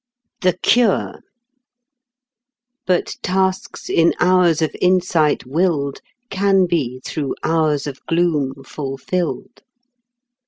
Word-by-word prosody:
THE 180 -2 +2
CURE 235 -4 +2 1.7
"But 180 -2 0
tasks 190 0 -1
in 165 0 +3
hours 175 -3 +3
of 155 - -2
insight 180 -6 +2
willed 145 -1 -1 0.3
Can 195 -1 +3
be 130 -8 -2
through 145 -3 -3
hours 155 -3 +1
of 140 -2 -7
gloom 150 -6 0
fulfilled." 150 - -4
170 Hz, 90 wpm, -19 LUFS, 145-185 Hz, 1.7 s, in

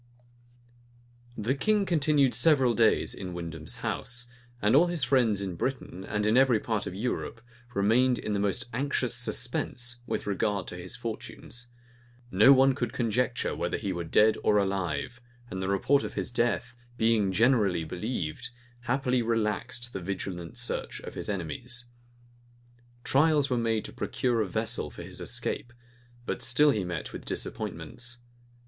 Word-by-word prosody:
The 115 +5 0
king 205 +9 +2
continued 150 -6 +3
several 135 -7 +4
days 115 -1 +3
in 90 -2 -6
Windham's 80 -2 -5
house; 120 0 -2 0.3
and 105 +3 +3
all 170 +5 +6
his 175 -5 -1
friends 115 -8 +3
in 95 -2 -3
Britain, 110 -4 -3
and 105 +1 -1
in 110 +3 +4
every 130 -4 +5
part 110 -2 -2
of 90 - -5
Europe, 120 +2 -3 0.4
remained 120 +5 +3
in 105 - -3
the 100 - 0
most 100 +5 0
anxious 140 +4 0
suspense 120 0 -1
with - - -2
regard 100 -1 0
to - - -7
his 90 +4 -5
fortunes: 120 +3 -6 0.6
no 105 +8 +7
one 135 0 +6
could 120 -3 -3
conjecture 120 +1 0
whether - - -1
he 95 - -2
were 85 -1 -3
dead 105 +7 +4
or 105 - +4
alive; 100 +4 -1 0.3
and 95 - -3
the 95 - -1
report 130 +9 +3
of - - -5
his - - -2
death, 120 0 0 0.2
being 110 -4 +3
generally 105 -5 +3
believed, 100 +4 -4 0.4
happily 125 0 +1
relaxed 115 +2 -1
the 95 - -4
vigilant 90 -3 -5
search - - -3
of - - -8
his - - -5
enemies. 110 +7 -4 1.2
Trials 145 -1 +3
were - - +3
made 115 -2 0
to - - -8
procure 120 -3 0
a 105 - 0
vessel - - 0
for - - -9
his - - -7
escape; 120 - -2 0.5
but - - -3
he - - -1
still 125 -5 +4
met 85 -3 -4
with - - -7
disappointments. 120 +1 -4
115 Hz, 155 wpm, -29 LUFS, 100-125 Hz, 1.2 s, no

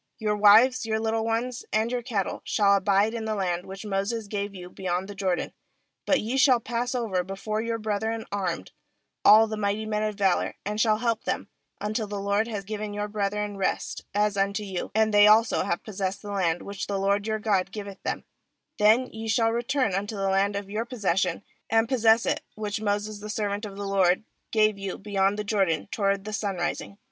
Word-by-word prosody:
14Your 210 -2 0
wives, 225 +6 +6
your 220 0 0
little 220 0 0
ones, 230 +2 -2
and 220 +2 +1
your 250 -1 -1
cattle, 225 -6 -2
shall 200 -1 +3
abide 200 +2 +2
in 225 -1 -4
the 215 -1 -1
land 180 -3 -2
which 195 +2 -8
Moses 210 +3 -2
gave 200 -1 -4
you 180 -1 -8
beyond 180 0 -3
the 205 - -7
Jordan; 190 -3 -1 0.5
but 280 - +4
ye 235 +5 -2
shall 260 -2 +5
pass 240 +2 -2
over 210 -7 0
be 195 +2 -6
fore 215 +2 -2
your 230 0 -2
brethren 220 +1 -2
armed, 185 - -3 0.5
all 215 +2 +8
the 215 -1 -5
mighty 205 +1 -1
men 215 -1 -1
of 215 -1 -1
valour, 195 -3 +1
and 210 +1 -1
shall 215 -2 +3
help 230 -1 -1
them; - - -2 0.3
15until 215 0 -2
the 205 -1 -3
LORD 200 +2 +1
have 205 -4 -5
given 210 0 -4
your 205 0 -2
brethren 205 0 -2
rest, 195 - -2
as 210 0 +1
unto 200 +1 0
you, 190 -3 -4
and 220 -1 +3
they 205 0 +7
also 220 +2 +5
have 170 - -2
possessed 195 -2 -4
the 205 - -6
land 175 -4 0
which 200 -1 -5
the 200 - -1
LORD 200 +2 +1
your 220 0 0
God 200 -3 0
giveth 200 -2 -7
them; - - -3 0.6
then 220 +5 +5
ye 220 0 -6
shall 225 0 +2
return 240 -1 0
unto 205 +3 -2
the 195 -1 -1
land 200 +1 +2
of 200 -1 -4
your 210 +3 -2
possession, 195 -6 -1 0.3
and 225 0 +3
possess 230 -2 +4
it, - - 0
which 210 0 -3
Moses 205 0 -1
the 210 +1 -8
servant 205 0 -2
of 200 -1 -8
the 200 - -4
LORD 190 -1 +2 0.3
gave 215 -2 +3
you 195 -1 -4
beyond 200 0 0
the 210 - -2
Jordan 195 -7 +1
toward 200 -2 0
the 215 +1 -6
sunrising.' 200 -1 -3
210 Hz, 205 wpm, -26 LUFS, 195-220 Hz, 0.6 s, all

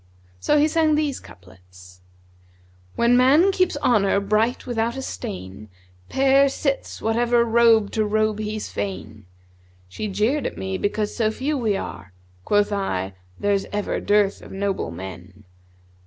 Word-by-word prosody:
So 295 - +2
he 295 +1 +4
sang 315 -1 +2
these 295 -3 -1
couplets, 90 0 -17 0.9
'When 235 +1 +3
man 285 +10 +5
keeps 370 -5 +1
honour 200 -4 +3
bright 215 +4 0
without 235 0 -1
a - - -3
stain, 95 - -7 0.2
* 90 0 -31
Pair 275 +1 +4
sits 275 0 -3
whatever 235 +1 +2
robe 225 -2 +4
to 220 - 0
robe 215 0 0
he's 215 0 -4
fain! 100 0 -6 0.6
She 155 - -5
jeered 215 +9 0
at - - -7
me 190 0 -3
because 205 +1 -2
so 220 -3 +1
few 270 +7 -2
we 220 -7 0
are; 95 - -8
* 90 0 -32
Quoth 205 0 +2
I:—'There's 95 - -2
ever 205 0 -2
dearth 205 -1 +1
of - - -12
noble 195 - -2
men!' 95 +3 -10
210 Hz, 145 wpm, -22 LUFS, -, 0.9 s, man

